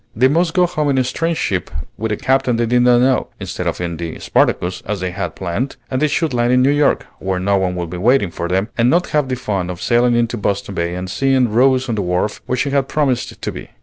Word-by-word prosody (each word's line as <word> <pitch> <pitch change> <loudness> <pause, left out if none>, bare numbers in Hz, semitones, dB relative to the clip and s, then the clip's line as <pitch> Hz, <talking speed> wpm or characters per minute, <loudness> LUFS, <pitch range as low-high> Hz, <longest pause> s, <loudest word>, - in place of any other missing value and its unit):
They 125 +4 +4
must 165 +4 +1
go 180 -1 +5
home 155 -4 -1
in 135 - +1
a 130 - +3
strange 165 +6 -1
ship 95 -2 -1 0.3
with 110 +1 -3
a 105 - -1
captain 130 -1 +1
they 120 +1 +1
did 120 +2 +2
not 120 0 +5
know, 130 0 +2
instead - - -4
of - - -2
in 85 -2 -3
the 85 -1 -5
"Spartacus," 90 +1 0
as 105 -1 -2
they 90 0 -3
had 90 -2 -4
planned; 95 +9 -3 0.2
and 130 - -1
they 155 - +4
should 155 0 -1
land 120 0 +1
in 125 0 +4
New 135 - +4
York, 145 0 +2
where 95 -1 -2
no 100 +2 +1
one 95 -1 -1
would 85 -2 -4
be 90 - -5
waiting 115 -2 +3
for 85 - -4
them, 95 +4 0
and 115 +1 +3
not 175 +5 +2
have 150 -3 0
the 130 - 0
fun 100 -7 -3
of 90 -2 -5
sailing 120 +3 +2
into 120 0 0
Boston 100 -1 -2
Bay 85 -1 -2
and 90 +1 -4
seeing 130 +3 +1
Rose 130 +3 +3
on 120 - -1
the 105 - -1
wharf, 90 +3 -1
where 125 - -1
she 140 +2 0
had 135 -1 +1
promised 135 -5 -1
to - - -3
be. - - -9
120 Hz, 265 wpm, -18 LUFS, 95-135 Hz, 0.3 s, go